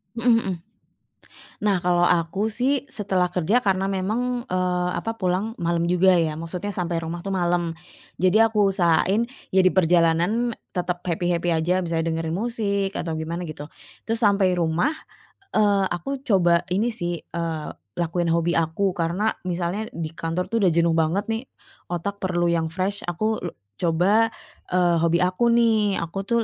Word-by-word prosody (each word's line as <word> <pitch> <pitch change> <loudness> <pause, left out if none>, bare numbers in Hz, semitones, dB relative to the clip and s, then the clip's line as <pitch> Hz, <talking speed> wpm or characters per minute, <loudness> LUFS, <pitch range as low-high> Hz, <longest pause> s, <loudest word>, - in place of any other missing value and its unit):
Mhm 235 +1 +2
mhm. 195 -5 -2 1.1
Nah 200 -3 +2
kalau 175 0 +2
aku 180 +5 +1
sih 260 +4 +1
setelah 190 -4 0
kerja 185 +8 +1
karena 195 -1 +1
memang, 225 +6 -1
eee, 180 -1 0
apa, 225 0 -4
pulang 195 +2 -1
malam 170 -2 0
juga 180 +2 +4
ya, 160 -2 0
maksudnya 180 +5 -5
sampai 170 -2 -1
rumah 165 +1 -5
tuh 195 - -4
malem. 175 -2 0 0.5
Jadi 185 +5 +5
aku 215 -3 +3
usahain 185 +4 +3 0.3
ya 190 - +7
diperjalanan 180 +5 +3 0.2
tetep 180 0 -1
happy-happy 175 0 0
aja, 175 +3 +1
misalnya 165 -2 -1
dengerin 160 0 -2
musik 200 -2 -1
atau 165 -4 -3
gimana 165 +2 -4
gitu. 150 0 -8 0.3
Terus 225 0 -2
sampai 200 -4 +3
rumah, 170 - +1 0.6
eee, 205 -2 +3
aku 260 +12 -4
coba 175 -5 +3
ini 210 +7 0
sih, 175 -6 -4
eee, 165 -2 -4 0.3
lakuin 175 0 -1
hobi 170 +1 +1
aku 165 +4 0
karena 180 +5 0 0.2
misalnya 180 +4 -2
di 160 -2 -4
kantor 165 +2 -3
tuh 230 - +1
udah 190 -4 +4
jenuh 170 0 +3
banget 165 +4 +1
nih 225 +4 -3 0.4
otak 190 +4 -4
perlu 175 -3 0
yang 165 -1 +1
fresh 185 +5 -2
aku 215 +6 -1
lu 175 - -5 0.3
coba, 180 +7 +3 0.5
eee, 175 -1 +3
hobi 170 +1 +2
aku 185 +6 +1
nih. 220 -4 +3
Aku 190 +4 -5
tuh 235 +1 +2
180 Hz, 155 wpm, -23 LUFS, 170-205 Hz, 1.1 s, ya